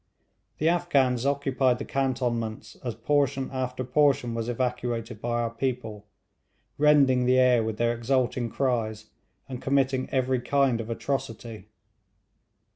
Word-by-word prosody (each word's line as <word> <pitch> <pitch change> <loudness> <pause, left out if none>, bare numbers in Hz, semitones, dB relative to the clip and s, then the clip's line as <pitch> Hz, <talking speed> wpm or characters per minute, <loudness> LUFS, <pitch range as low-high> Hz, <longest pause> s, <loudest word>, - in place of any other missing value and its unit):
The 155 - 0
Afghans 140 -8 +2
occupied 135 -3 +1
the 140 - -6
cantonments 120 -5 -2
as 120 -4 -3
portion 135 +1 0
after 130 -1 -3
portion 130 -2 +2
was 115 0 -3
evacuated 120 -2 -3
by 120 0 -1
our 115 -1 -2
people, 115 -4 -4 0.7
rending 140 -4 +4
the 130 0 +4
air 125 -2 +4
with 110 -1 -3
their 120 +1 +1
exulting 120 0 0
cries, 110 -4 -2 0.4
and 130 -2 -7
committing 135 -1 +1
every 130 -1 0
kind 130 -2 +1
of 115 - -8
atrocity. 115 -2 -4
125 Hz, 125 wpm, -26 LUFS, 115-135 Hz, 0.7 s, rending